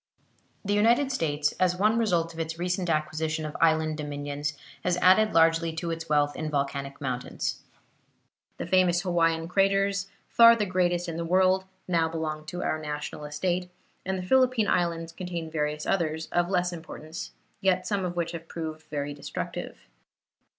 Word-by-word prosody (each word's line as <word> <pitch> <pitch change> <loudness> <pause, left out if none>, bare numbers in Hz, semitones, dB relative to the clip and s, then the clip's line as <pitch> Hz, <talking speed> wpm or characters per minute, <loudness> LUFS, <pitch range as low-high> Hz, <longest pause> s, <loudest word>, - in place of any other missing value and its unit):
The 205 - +1
United 235 +6 +3
States, 150 - 0
as 180 -1 +3
one 215 +5 +2
result 170 -7 +1
of 165 - -10
its 165 0 -3
recent 180 +1 -1
acquisition 155 0 -1
of 150 - -6
island 160 -1 +3
dominions, 145 0 -4 0.3
has 180 -1 +1
added 190 +4 +5
largely 165 0 +3
to 170 +1 -3
its 165 -1 -5
wealth 145 -1 +2
in 155 -1 -3
volcanic 140 -1 -2
mountains. 130 -3 -3 1.0
The - - -4
famous 175 0 +3
Hawaiian 165 -2 +1
craters, 195 +1 +2 0.2
far 230 0 +7
the 215 -2 0
greatest 175 -2 +1
in 165 -1 -4
the 170 - -2
world, 185 +2 +3 0.2
now 165 -3 +2
belong 155 -1 -4
to 175 +3 -4
our 155 - -1
national 150 0 -5
estate, 175 +4 -2 0.3
and 190 0 -2
the 185 - -4
Philippine 255 -1 +3
Islands 165 -1 0
contain 170 -2 -5
various 150 -1 -2
others, 160 -3 0
of 175 0 +1
less 180 -2 +1
importance, 160 -1 -8 0.3
yet 185 -2 +2
some 200 0 -1
of 175 -1 -3
which 170 -1 -1
have 165 -1 -7
proved 160 -2 -5
very 145 -1 -3
destructive. 145 - -5
165 Hz, 165 wpm, -27 LUFS, 155-185 Hz, 1.0 s, far